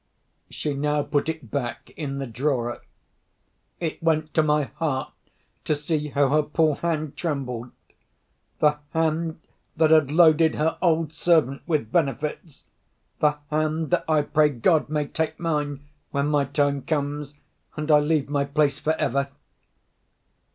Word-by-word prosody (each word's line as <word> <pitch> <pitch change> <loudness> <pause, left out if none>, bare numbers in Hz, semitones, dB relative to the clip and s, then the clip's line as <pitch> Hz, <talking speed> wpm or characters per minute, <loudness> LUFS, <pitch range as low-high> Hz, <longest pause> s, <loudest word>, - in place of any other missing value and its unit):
She 150 - -3
now 150 +1 0
put 145 +2 0
it 160 -8 -6
back 125 -4 -4
in 140 -3 -4
the 135 - -3
drawer. 120 0 -2 1.0
It 165 -3 -3
went 155 -2 +1
to 160 - +4
my 150 -1 +2
heart 140 -2 -3 0.5
to 155 - +1
see 150 0 -2
how 140 -1 +2
her 155 +2 +4
poor 155 +1 +1
hand 155 -3 -2
trembled—the 140 +1 -4 0.2
hand 160 0 0 0.4
that 160 -1 +4
had 155 -4 +5
loaded 160 0 +5
her 160 +1 0
old 165 -3 +2
servant 155 -5 +2
with 150 -10 0
benefits; 150 +1 -2 0.6
the 150 -1 +3
hand 155 +1 0
that, 180 - +1
I 155 -2 +3
pray 150 0 +3
God, 150 +4 +2
may 150 -1 0
take 160 +2 -3
mine, 150 -4 -1 0.3
when 140 0 0
my 145 -2 +2
time 140 0 0
comes, 145 0 -3 0.4
and 150 0 -1
I 150 - +7
leave 150 -1 +1
my 140 -1 0
place 140 0 +1
for 155 - +1
ever! 140 -2 0
150 Hz, 145 wpm, -24 LUFS, 140-160 Hz, 1.0 s, I